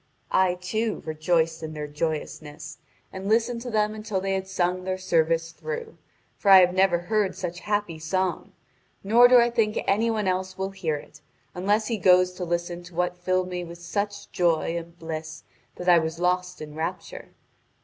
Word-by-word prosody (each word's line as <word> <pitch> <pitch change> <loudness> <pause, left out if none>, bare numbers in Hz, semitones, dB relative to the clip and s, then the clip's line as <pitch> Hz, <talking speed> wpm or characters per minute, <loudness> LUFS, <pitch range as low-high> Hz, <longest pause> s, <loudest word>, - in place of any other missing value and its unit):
I, 185 -1 +3
too, 215 +5 -2
rejoiced 160 +1 0
in 160 -1 -6
their 150 -1 -4
joyousness, 150 0 -5 0.3
and 190 +1 -5
listened 230 +2 +1
to 245 - -5
them 215 -1 +1
until 215 -2 -3
they 195 +1 -1
had 190 0 -2
sung 185 -1 -1
their 185 0 -2
service 165 -2 +1
through, 465 - -6 0.4
for 200 - +1
I 190 -1 +10
have 180 0 +3
never 185 -1 +3
heard 200 0 0
such 175 -2 -5
happy 205 -6 -2
song, 185 +3 -2 0.5
nor 230 +5 +7
do 250 0 +7
I 240 0 +4
think 215 -2 +1
any 220 +4 +2
one 215 -3 -1
else 185 0 -1
will 190 0 -3
hear 180 -6 -2
it, 150 +1 -11 0.3
unless 205 +4 +1
he 225 -1 -2
goes 185 -1 +5
to 180 0 -6
listen 175 0 -2
to 175 -1 -13
what 180 +1 0
filled 185 +1 -1
me 180 -1 -4
with 170 0 -9
such 200 +4 -4
joy 170 -1 +1
and 170 0 -7
bliss 160 -1 -6 0.3
that 180 - -7
I 175 -1 +7
was 160 0 -3
lost 180 0 0
in 150 -1 -8
rapture. 165 - -5
180 Hz, 185 wpm, -25 LUFS, 170-205 Hz, 0.5 s, I